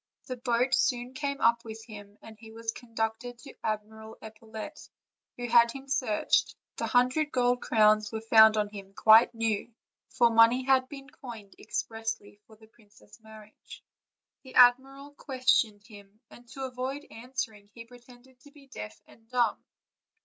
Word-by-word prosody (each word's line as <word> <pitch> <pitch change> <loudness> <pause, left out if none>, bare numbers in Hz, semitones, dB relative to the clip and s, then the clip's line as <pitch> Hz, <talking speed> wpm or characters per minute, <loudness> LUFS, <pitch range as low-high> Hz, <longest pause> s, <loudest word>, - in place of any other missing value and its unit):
The 255 - -5
boat 245 +1 0
soon 245 0 0
came 280 0 -4
up 235 0 +3
with 220 -1 -10
him, 205 -2 -12
and 220 - -12
he 220 +1 -15
was 225 0 -4
conducted 230 +1 -5
to 275 +3 -13
Ad 215 -1 -1
miral 220 +1 -13
Epaulette, 220 +6 -10 0.5
who 245 0 -4
had 235 0 +5
him 270 +2 -10
searched; 250 -6 0 0.2
the - - -2
hundred 255 +5 +1
^old 245 -1 +1
crowns 215 -1 +3
were 220 - -4
found 220 -1 +6
on 210 -1 0
him 195 -1 -11
quite 225 +2 +6
new, 225 0 -2 0.4
for 235 -1 +3
money 230 +3 +5
had 260 0 +2
been 275 -2 -10
coined 230 -8 -11
expressly 225 -2 -5
for 220 - -17
the 220 +1 -19
princess' 220 0 -22
wedding. 215 -1 -14 0.9
The 260 - -14
admiral 270 +3 +4
questioned 255 -7 0
him, 205 -1 -16
and, 240 0 -16
to 265 +4 -8
avoid 260 +3 -5
answering, 225 -4 -6
he 230 +1 -12
pretended 245 +1 -18
to 290 - -18
be 285 -1 -19
deaf 105 - -10
and 225 0 -22
dumb. 240 -3 0
230 Hz, 160 wpm, -28 LUFS, 220-255 Hz, 0.9 s, found